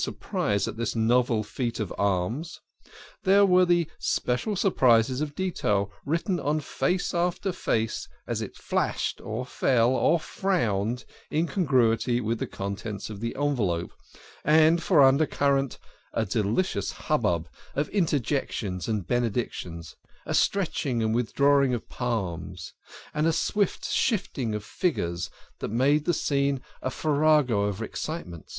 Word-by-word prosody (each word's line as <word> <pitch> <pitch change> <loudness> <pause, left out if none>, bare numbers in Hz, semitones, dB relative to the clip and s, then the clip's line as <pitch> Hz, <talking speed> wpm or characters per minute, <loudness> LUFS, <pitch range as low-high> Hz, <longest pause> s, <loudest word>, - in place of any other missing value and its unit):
surprise 100 0 -1
at - - -5
this 115 +1 -2
novel 115 0 +2
feat 120 +2 -3
of 105 -5 -3
alms; 100 - -1 0.6
there 200 +1 +5
were 185 -1 +5
the 175 -2 +2
special 125 - 0
surprises 130 - +3
of 145 -1 -3
detail 105 - 0 0.2
writ 165 +3 0
ten 185 -4 0
on 150 +2 0
face 180 +5 -1
after 180 +2 0
face, 115 -10 -1 0.2
as - - -2
it - - -6
flashed - - -1
or 110 +4 -4
fell 125 -1 +2
or 165 +5 +3
frowned 125 - -1 0.2
in 160 +2 +1
congruity 125 - +2
with 115 -1 -1
the - - -2
contents 100 +2 -5
of 100 - -7
the 115 +2 -3
envelope, 115 -13 0 0.5
and 160 +2 +5
for 160 -7 +5
under 135 +3 +5
current 140 -2 +1 0.4
a 110 - 0
delicious 110 - 0
hubbub 105 - 0 0.3
of 145 +1 0
interjections 135 - -1
and 105 -5 -1
benedictions, 100 -8 -2 0.3
a - - -3
stretching 145 - +1
and 110 0 +1
withdrawing 140 +2 +3
of 115 - -7
palms, 90 -7 -4 0.4
and 150 +1 +1
a - - +4
swift 200 +4 0
shifting 135 - 0
of 105 - -4
figures, 85 - -1 0.3
that - - -3
made 140 +7 +2
the 175 - +3
scene 140 -3 +1 0.2
a - - -1
farrago 145 -7 +2
of 105 +2 -2
excitements. 105 - -6
125 Hz, 140 wpm, -27 LUFS, 110-155 Hz, 0.6 s, there